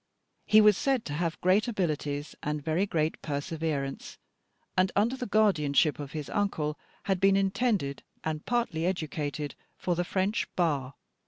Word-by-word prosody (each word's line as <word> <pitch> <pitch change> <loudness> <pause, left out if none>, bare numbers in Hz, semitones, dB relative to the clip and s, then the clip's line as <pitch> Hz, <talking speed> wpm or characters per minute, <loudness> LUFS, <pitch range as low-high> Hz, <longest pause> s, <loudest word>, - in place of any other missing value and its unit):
He 215 0 +7
was 210 -2 +6
said 270 -5 +1
to 145 - -4
have 165 +1 -2
great 190 +5 +3
abilities 150 -8 -2
and 150 0 -2
very 165 +6 +1
great 160 -3 -1
perseverance, 145 -1 -3 0.6
and 185 0 +3
under 225 +6 +2
the 250 -2 -4
guardianship 160 -9 +3
of 140 -2 -6
his 150 -3 -4
uncle 160 -7 -1 0.2
had 190 -2 0
been 195 0 +5
intended 195 - 0 0.2
and 155 -1 -3
partly 205 -9 0
educated 150 -4 -3 0.2
for 180 - 0
the 175 - 0
French 195 +5 0
Bar. 140 -7 0
170 Hz, 150 wpm, -29 LUFS, 150-200 Hz, 0.6 s, He